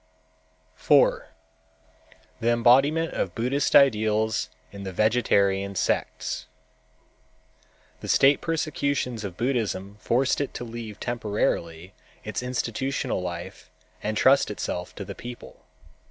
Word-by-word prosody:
4. - - +3 1.1
The 115 - +1
Embodiment 135 +8 +4
of 90 - -2
Buddhist 130 +5 0
Ideals 110 -4 +3 0.2
in 100 - -9
the 95 -1 -5
Vegetarian 100 -2 +2
sects - - -2 1.5
The - - -8
state 140 +1 +4
persecutions 140 -7 -1
of 95 -3 -6
Buddhism 105 -6 -2
forced 130 +5 +1
it 140 - -4
to - - -4
leave 115 -3 -7
temporarily 100 -6 -2 0.3
its 110 - -4
institutional 125 -2 -2
life 85 -1 -7 0.3
and 110 0 -2
trust 135 +4 +4
itself 90 -3 -4
to - - -6
the - - -6
people. 120 0 -11
115 Hz, 110 wpm, -25 LUFS, 100-130 Hz, 1.5 s, Embodiment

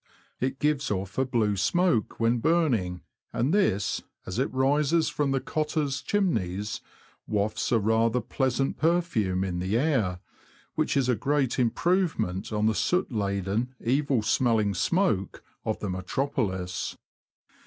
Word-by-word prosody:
It 130 +1 -1
gives 150 -1 0
off 95 +2 -3
a 130 - +3
blue 110 -5 +1
smoke 140 - +1
when 115 +1 +2
burning, 115 - +1 0.3
and 130 +8 0
this, 110 - +1 0.2
as 95 +6 -4
it 135 - 0
rises 145 +5 +2
from 145 -2 0
the 135 0 +1
cottars' 150 -2 -1
chimneys, 105 - -1 0.5
wafts 105 +3 -1
a 120 - +5
rather 115 +3 +2
pleasant 130 +3 -1
perfume 155 - +1
in 90 -2 -2
the 95 +5 0
air, 120 - +1 0.6
which - - 0
is 135 -2 +2
a 125 - +3
great 135 +1 0
improvement 130 - 0
on 105 0 0
the 110 - +3
soot 180 - 0
laden, 100 +3 -1
evil 135 -1 +1
smelling 110 -3 +2
smoke 105 - 0 0.2
of 110 - -1
the 105 - -2
metropolis. 95 -2 -2
120 Hz, 135 wpm, -27 LUFS, 100-145 Hz, 0.6 s, a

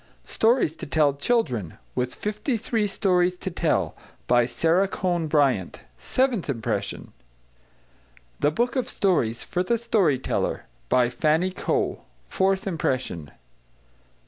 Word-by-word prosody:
=Stories 225 - +2
to - - -7
Tell 145 -1 +3
to 140 - -18
Children= 125 - 0 0.2
With 125 0 -2
Fifty 210 +4 -2
Three 220 -1 0
Stories 180 -2 +1
to 190 - -5
Tell. 150 - 0 0.3
By 120 -1 +3
SARA 170 +8 +2
CONE 175 -4 -1
BRYANT. 135 - +1 0.2
Seventh 255 - 0
Impression. 115 -3 -3 1.3
=The 145 - +3
Book 235 +10 0
of 255 - -1
Stories 125 - +1
for 180 - -2
the 230 +6 +1
Story 210 - +2
Teller= 130 - -2 0.3
By 125 -1 +3
FANNY 160 +6 +1
COE. - - -1 0.3
Fourth 190 - +1
Impression. 130 - -2
170 Hz, 125 wpm, -25 LUFS, 130-205 Hz, 1.3 s, Tell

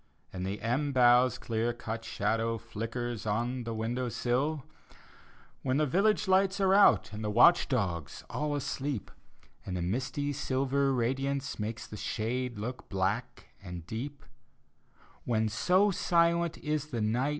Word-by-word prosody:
And 90 0 -3
the 100 +2 -3
elm 135 +5 0
bough's 125 0 +5
clear 115 +1 -1
cut 115 -1 -5
shadow 115 +1 -1
Flickers 115 +1 -5
on 120 +4 -1
the 115 - -3
window 120 +3 -2
sill 135 +6 -1 0.5
— - - -27
When 130 +1 0
the 155 - +3
village 200 +8 +2
lights 190 +1 +3
are 190 -1 +4
out, 200 - +5
And 105 +1 -5
the 105 - -1
watch 120 +11 +6
dogs 90 - -2
all 150 0 -2
asleep, 140 -4 -3 0.5
And 90 -2 -4
the 85 - -2
misty 135 +9 -2
silver 135 0 0
radiance 135 +2 -1
Makes 110 +2 -4
the 105 - -9
shade 120 +2 -2
look 120 +5 -6
black 95 -2 -2
and 90 -3 -8
deep 135 - -6 0.5
— - - -31
When, 110 -2 +1
so 185 - +3
silent 170 -1 +2
is 150 -1 -2
the 120 -7 -3
night. 120 +6 +1
125 Hz, 150 wpm, -30 LUFS, 110-145 Hz, 0.5 s, watch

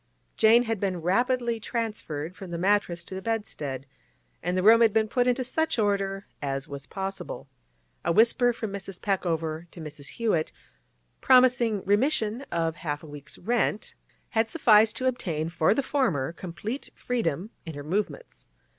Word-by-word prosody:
Jane 225 +2 +6
had 225 -3 -2
been 185 -3 -1
rapidly 235 +5 +1
transferred 210 - -4
from 190 - -9
the 170 - -4
mattress 185 -2 +1
to - - -11
the 190 - -4
bedstead, 150 - -3 0.6
and 180 +1 -1
the 185 - +1
room 225 +3 +7
had 225 -3 +5
been 220 0 +3
put 245 +2 +1
into 250 +1 +2
such 320 +5 0
order 200 -2 0 0.2
as 135 -1 -3
was 140 -1 -8
possible. 195 0 -5 0.6
A - - +1
whisper 235 +5 +4
from 220 -4 -5
Mrs. 195 -2 -6
Peckover 165 -4 -1
to 175 - -13
Mrs. 150 -3 -8
Hewett, 210 -9 +1 0.7
promising 250 -5 +4
remission 220 +2 +1
of 165 -1 -1
half 145 -2 -4
a - - -9
week's 145 -1 -11
rent, 220 0 -1 0.4
had 225 -1 +1
sufficed 220 -7 +5
to 260 - -2
obtain 165 -11 -1
for 165 +3 +2
the 280 - +1
former 180 - 0
complete 200 - -6
freedom 215 - -2 0.2
in 160 - -5
her 145 - -6
movements. 190 - -4
200 Hz, 160 wpm, -27 LUFS, 165-230 Hz, 0.7 s, room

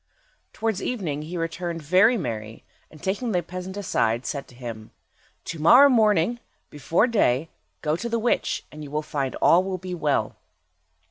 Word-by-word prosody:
Towards 220 -3 -2
evening 170 - -3
he 165 +4 -6
returned 165 0 -4
very 185 +10 +4
merry, 110 - -5 0.3
and 155 - -16
taking 215 +4 -1
the 175 -1 +1
peasant 185 +3 -7
aside, 120 - 0
said 140 -2 -4
to 125 - -17
him— 115 -3 -8 0.6
"To 165 - -6
morrow 250 - +7
morning, 220 -2 +3 0.3
before 160 - +1
day, 160 - +1 0.3
go 155 0 +1
to 235 +8 -4
the 230 - 0
witch, 230 +1 0
and 155 0 -9
you 145 - -8
will 150 +2 -2
find 140 -3 -3
all 175 +2 +4
will 190 -1 -3
be 185 0 -7
well." 150 -5 -1
170 Hz, 170 wpm, -24 LUFS, 150-205 Hz, 0.6 s, morrow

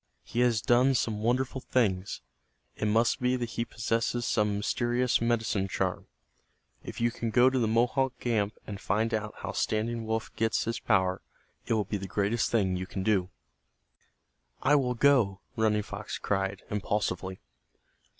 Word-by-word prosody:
He 120 - -4
has 120 -3 +3
done 125 +3 +4
some 110 -3 -1
wonderful 130 +3 0
things. 100 -8 0 0.5
It - - -3
must 115 +5 +2
be 125 +1 +2
that 120 -2 -3
he 115 - -1
possesses 115 +2 -1
some 105 -2 +1
mysterious 120 +4 +1
medicine 115 -4 0
charm. 95 -1 -2 0.8
If - - -7
you 120 0 +2
can 115 -1 -3
go 125 +3 +5
to 130 - +1
the 115 - +2
Mohawk 125 +4 +1
camp 110 -4 0
and 105 -1 -7
find 110 +4 0
out 105 -1 -2
how - - -3
Standing 115 +1 -1
Wolf 110 0 -3
gets 115 0 +1
his 115 - -2
power 95 -4 +1 0.5
it - - +1
will 105 -2 +1
be 105 - -2
the 95 0 -6
greatest 105 +4 0
thing 95 -5 +1
you 95 0 -4
can 95 0 -4
do." 95 -3 +1 1.3
"I 145 - +4
will 130 -4 +2
go," 115 -8 +3
Running 110 -2 +2
Fox 100 0 -6
cried, 95 -1 -2
impulsively. 95 -2 -2
110 Hz, 160 wpm, -29 LUFS, 100-120 Hz, 1.3 s, go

